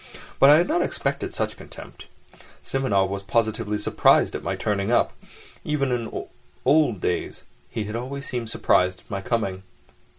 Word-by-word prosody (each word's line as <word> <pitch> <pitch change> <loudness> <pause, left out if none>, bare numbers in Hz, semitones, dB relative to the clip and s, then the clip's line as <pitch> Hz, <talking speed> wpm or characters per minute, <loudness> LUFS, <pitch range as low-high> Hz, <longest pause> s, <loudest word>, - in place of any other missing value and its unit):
But 135 - +8
I 145 - +9
had 170 - +2
not 340 +3 +1
expected - - -2
such - - -2
contempt. - - -11 0.6
Simonov 105 -8 +1
was 100 0 -3
positively 110 0 0
surprised 105 - +3
at - - -4
my - - -2
turning 100 +1 -1
up. 120 - +3 0.5
Even 140 -3 0
in 120 -2 -3 0.4
old 140 - +4
days 90 - -2 0.3
he 110 - -3
had 105 +1 -5
always 135 +4 -5
seemed 120 -3 -3
surprised 90 -4 +2
at - - -20
my 100 -1 -2
coming. 95 -4 -1
115 Hz, 160 wpm, -24 LUFS, 100-135 Hz, 0.6 s, I